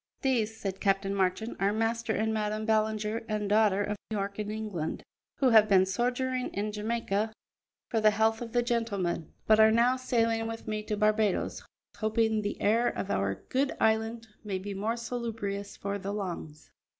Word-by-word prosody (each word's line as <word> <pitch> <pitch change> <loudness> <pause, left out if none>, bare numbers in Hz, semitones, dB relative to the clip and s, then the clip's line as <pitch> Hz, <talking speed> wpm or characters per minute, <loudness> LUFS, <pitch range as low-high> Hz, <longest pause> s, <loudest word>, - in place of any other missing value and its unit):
"These," 225 -5 +1
said 195 -1 -4
Captain 195 -1 +1
Marchand, 195 +3 0
"are 195 +1 +2
Master 225 +1 0
and 220 0 0
Madam 215 0 -1
Ballinger 220 0 0
and 210 -1 -1
daughter, 205 -1 +3
of 210 +1 -2
York 200 -1 -3
in 210 -1 -3
England, 210 -7 -4 0.3
who 265 - +4
have 215 -1 +7
been 190 -2 +6
sojourning 250 +5 -1
in 210 +2 -1
Jamaica 215 0 -1 0.6
for 225 - 0
the 215 - +7
health 220 +2 +1
of 235 -1 -5
the 240 0 +2
gentleman, 205 - -1
but 215 0 +5
are 220 0 +8
now 235 +3 +3
sailing 230 -3 +1
with 225 0 -6
me 215 0 -2
to 210 -1 -2
Barbadoes, 210 -1 +1 0.4
hoping 220 0 +1
the 205 0 -3
air 230 +4 +3
of 200 - -2
our 100 0 -1
good 270 +2 +1
island 225 +1 +1 0.2
may 200 -3 -2
be 200 +2 -5
more 215 +4 -1
salubrious 225 -4 -4
for 200 0 -3
the 200 +1 -4
lungs." 175 -7 -6
215 Hz, 175 wpm, -29 LUFS, 200-225 Hz, 0.6 s, are